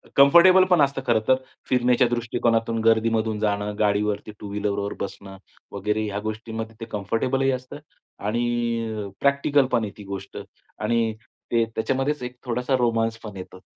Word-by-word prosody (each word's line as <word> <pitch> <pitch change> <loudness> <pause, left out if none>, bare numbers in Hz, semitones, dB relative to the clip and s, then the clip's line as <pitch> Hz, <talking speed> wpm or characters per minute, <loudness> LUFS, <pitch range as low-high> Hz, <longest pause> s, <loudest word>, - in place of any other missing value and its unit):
Comfortable 170 +7 +7
पण 175 -4 +5
असतं 140 -1 +1
खरंतर, 115 +2 +3 0.3
फिरण्याच्या 125 0 +3
दृष्टिकोनातून, 115 -1 0
गर्दीमधून 110 -1 +2
जाणं, 105 -1 -1
गाडीवरती, 105 0 0
टू 105 - -7
व्हीलरवर 100 0 -2
बसणं 100 0 -7 0.3
वगैरे 105 +2 -1
या 100 0 -3
गोष्टींमध्ये 110 +1 -5
ते 115 - -5
कम्फर्टेबलही 125 +6 0
असतं. 130 +3 -5 0.4
आणि 115 -1 -1
प्रॅक्टिकलपण 140 -4 +2
आहे 100 - -4
ती 105 - -10
गोष्ट. 95 - -7 0.4
आणि 115 -1 +1 0.4
ते 115 -1 +3
त्याच्यामध्येच 135 +4 -1
एक 125 0 -6
थोडासा 125 +2 0
रोमान्स 115 -2 +1
पण 105 -3 -8
येतोच. 95 0 -10
115 Hz, 135 wpm, -24 LUFS, 105-125 Hz, 0.4 s, Comfortable